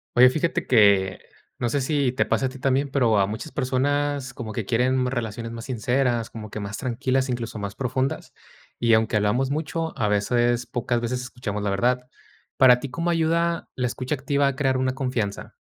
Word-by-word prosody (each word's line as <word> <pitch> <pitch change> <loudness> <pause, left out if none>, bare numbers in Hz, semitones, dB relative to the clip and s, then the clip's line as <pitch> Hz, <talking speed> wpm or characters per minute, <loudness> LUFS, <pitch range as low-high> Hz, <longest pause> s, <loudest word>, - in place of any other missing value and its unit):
Oye, 125 +1 +8
fíjate 160 +4 -1
que, 100 -5 +4 0.4
no 120 - 0
sé 140 +4 0
si 140 -1 +1
te 130 - 0
pase 135 - 0
a - - -4
ti 135 - -10
también, 135 +2 +1
pero 120 -6 +2
a 95 - +3
muchas 110 +9 -6
personas 140 0 0
como 110 -3 -6
que 110 -2 -3
quieren 125 +3 +1
relaciones 115 -2 -3
más 115 -1 -7
sinceras, 120 -1 0
como 110 -2 -8
que 105 - -6
más 100 +1 -5
tranquilas, 130 +1 0
incluso, 120 -2 -3
más 100 -1 -5
profundas. 130 +1 -2 0.5
Y 115 -1 +3
aunque 110 0 +1
hablamos 120 +6 +1
mucho, 160 +2 -2
a 110 - +2
veces, 120 +4 +1
pocas 120 -1 -1
veces 120 +2 -2
escuchamos 120 -4 -5
la 100 - -1
verdad, 125 +5 +1 0.5
¿para 125 -2 +7
ti 135 - -6
cómo 170 +6 -1
ayuda, 170 0 0
la 125 - -1
escucha 130 +3 -2
activa 140 +1 +1
a 140 - -1
crear 135 -1 +1
una 130 0 0
confianza? 125 -7 -3
125 Hz, 190 wpm, -24 LUFS, 115-135 Hz, 0.5 s, Oye